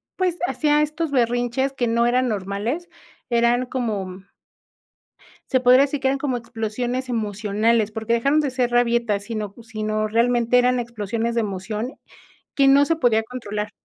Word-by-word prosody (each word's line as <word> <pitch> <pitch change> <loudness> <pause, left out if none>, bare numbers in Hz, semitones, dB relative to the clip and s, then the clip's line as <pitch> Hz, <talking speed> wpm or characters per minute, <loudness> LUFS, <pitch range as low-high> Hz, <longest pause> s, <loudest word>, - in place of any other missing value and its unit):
pues, 365 -2 0
hacía 300 -3 +2
estos 305 +1 -2
berrinches 245 +1 0
que 245 -3 -1
no 235 +1 +2
eran 255 +1 +2
normales, 215 - -3 0.4
eran 235 +1 +2
como 200 -8 -3 1.3
se 260 - +3
podría 255 +1 +6
decir 285 0 0
que 265 - 0
eran 275 +1 +1
como 270 -3 -2
explosiones 240 +3 -4
emocionales, 215 0 0
porque 220 +1 -2
dejaron 275 +6 +2
de 290 -3 0
ser 250 -1 0
rabietas, 235 -4 +1
sino 215 -3 -4
sino, 215 -1 -2
realmente 235 +2 +2
eran 250 0 +3
explosiones 230 0 -3
de 230 - +2
emoción 210 +5 -4 0.6
que 275 -1 +3
no 280 +1 +6
se 330 - +1
podía 225 -7 +2
controlar, 210 -3 -5
235 Hz, 150 wpm, -22 LUFS, 220-255 Hz, 1.3 s, podría